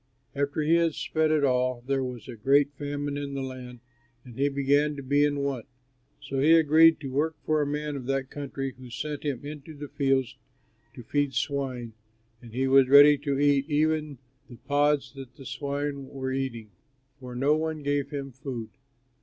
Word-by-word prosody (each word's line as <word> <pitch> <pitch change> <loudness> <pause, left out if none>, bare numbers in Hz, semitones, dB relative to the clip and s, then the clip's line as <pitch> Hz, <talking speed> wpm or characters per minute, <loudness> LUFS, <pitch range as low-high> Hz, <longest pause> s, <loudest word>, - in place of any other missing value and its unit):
After 140 +2 -1
he 165 +3 +4
had 165 -2 +1
spent 155 -1 0
it 155 -2 +2
all, 125 -2 +1
there 135 0 0
was 125 -3 -6
a 125 - -7
great 140 +6 +3
famine 145 0 -4
in 140 -1 -5
the 135 - -3
land, 125 -2 -8 0.4
and 120 -2 -12
he 140 +3 +1
began 145 +2 +1
to 140 - -7
be 145 +2 +2
in 145 -1 +1
want. 135 -5 -3 0.5
So 135 - -4
he 155 +4 +5
agreed 160 +1 +6
to 135 -3 -5
work 155 +4 0
for 155 -1 +2
a 145 - 0
man 150 0 -3
of 130 -3 -6
that 135 -1 -2
country, 135 -2 -5
who 125 -1 -11
sent 150 +4 -5
him 145 -3 -3
into 150 +1 -9
his 145 0 -8
fields 135 -3 0 0.6
to 120 - -9
feed 145 +3 -1
swine; 130 -5 -2 0.5
and 120 -2 -12
he 130 +3 0
was 135 -1 +5
ready 145 +1 +9
to 140 -1 -1
eat 140 0 +2
even 155 -1 0 0.3
the 120 - -10
pods 145 +1 +1
that 135 -3 -11
the 135 - -12
swine 140 0 -4
were 130 -1 -4
eating, 125 -5 -4 0.5
for 125 -2 -9
no 140 +4 +3
one 155 -1 -3
gave 145 0 0
him 140 -2 -5
food. 130 -4 -6
140 Hz, 190 wpm, -27 LUFS, 130-145 Hz, 0.6 s, ready